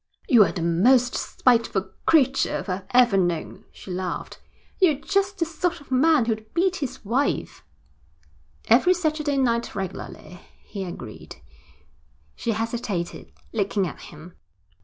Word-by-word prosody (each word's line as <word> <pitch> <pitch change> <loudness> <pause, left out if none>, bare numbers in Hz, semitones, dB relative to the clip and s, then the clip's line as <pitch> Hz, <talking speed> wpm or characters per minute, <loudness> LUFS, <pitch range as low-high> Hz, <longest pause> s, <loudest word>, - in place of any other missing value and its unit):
'You 235 -4 +7
are - - -2
the 175 - -4
most 240 +9 +3
spiteful 230 -6 +1 0.2
creature 270 -5 +3
I've 185 0 -3
ever 245 -5 +4
known,' 175 -4 -2
she 190 - -11
laughed. 180 0 -5 0.4
'You're 350 -6 +4
just 395 +7 -1
the 335 - +1
sort 335 +1 -2
of 285 - -18
man 280 0 +4
who'd 220 -1 -3
beat 370 +2 +2
his 275 - -6
wife.' 255 +7 -1 1.0
'Every 270 +11 +5
Saturday 305 -4 -1
night 235 -3 0
regularly,' 180 -2 -7 0.2
he 195 -2 -6
agreed. 175 - -9 1.0
She 230 - -2
hesitated, 220 -5 -4 0.2
looking 200 -2 0
at 165 - -7
him. 155 +4 -12
235 Hz, 130 wpm, -24 LUFS, 190-295 Hz, 1.0 s, You